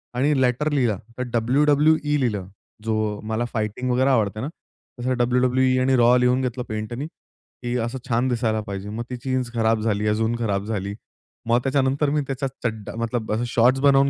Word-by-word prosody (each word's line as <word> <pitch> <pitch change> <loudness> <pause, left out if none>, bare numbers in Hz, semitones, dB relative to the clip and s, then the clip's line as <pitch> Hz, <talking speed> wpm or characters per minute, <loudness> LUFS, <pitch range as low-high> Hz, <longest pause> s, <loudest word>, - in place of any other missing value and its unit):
आणि 140 +3 +2
लेटर 130 +4 +1
लिहिला. 125 -8 +1 0.2
तर 125 - -1 0.2
WWE 150 +4 +3
लिहिलं. 105 -8 -1 0.4
जो 110 -1 -1
मला 115 +2 0
फायटिंग 110 +3 -2
वगैरे 130 +2 +3
आवडते 110 -4 +1
ना. 135 - -2 0.5
तसं 130 +1 0
WWE 130 +1 +2
आणि 130 +1 +3
रॉ 120 +1 +6
लिहून 125 +1 +3
घेतलं 125 -1 -2
पेंटनी 110 +6 -4
की 125 -6 -9
असं 120 +3 -4
छान 120 +2 +2
दिसायला 115 -3 0
पाहिजे. 100 +1 -5
मग 110 +3 -4
ती 125 - -3
जीन्स 130 -2 -1
खराब 115 -1 +2
झाली, 105 -1 0
अजून 110 +2 +1
खराब 100 -3 -1
झाली. 100 -2 -3 0.5
मग 120 +1 +4
त्याच्यानंतर 135 +1 +1
मी 150 +1 +1
त्याचा 135 0 -2 0.2
चड्डा 110 -2 -3
मतलब 115 -1 -2
अ, 110 - 0
शॉट्स 125 +3 +3
बनवून 140 -1 +5
120 Hz, 175 wpm, -23 LUFS, 110-130 Hz, 0.5 s, रॉ